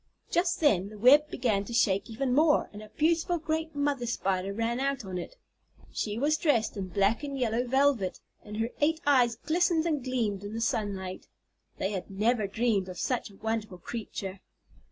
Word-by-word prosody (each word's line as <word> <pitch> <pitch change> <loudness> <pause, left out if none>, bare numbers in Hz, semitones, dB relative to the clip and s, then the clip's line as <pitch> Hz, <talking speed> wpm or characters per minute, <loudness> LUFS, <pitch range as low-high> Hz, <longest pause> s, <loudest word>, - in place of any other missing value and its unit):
Just 350 +1 +1
then 200 - +3
the 215 - -11
web 285 +7 +6
began 220 -8 0
to 235 - -5
shake 200 -2 +2
even 250 +3 -1
more, 300 +2 +3
and 205 - -8
a 215 - -11
beautiful 330 +6 +1
great 315 0 -3
mother 285 -4 0
Spider 195 -4 -1
ran 230 +4 -1
out 275 -4 -1
on 185 -1 -4
it. - - -8 0.5
She 210 0 -3
was 295 +5 +2
dressed 260 -10 +2
in 195 -2 -4
black 200 +6 +1
and 280 -1 -4
yellow 245 0 0
velvet, 265 -7 +2 0.2
and 210 0 -8
her 225 +2 -1
eight 320 +2 +3
eyes 250 -5 +4
glistened 325 +5 +1
and 300 -6 0
gleamed 225 -6 -1
in 205 +2 -6
the - - -2
sunlight. 200 -5 -2 0.5
They 190 - -1
had 190 -3 -4
never 215 +2 +1
dreamed 210 -3 0
of 180 - -7
such 250 +2 -1
a 200 - -16
wonderful 220 -2 -3
creature. 195 -2 -6
230 Hz, 185 wpm, -29 LUFS, 205-285 Hz, 0.5 s, web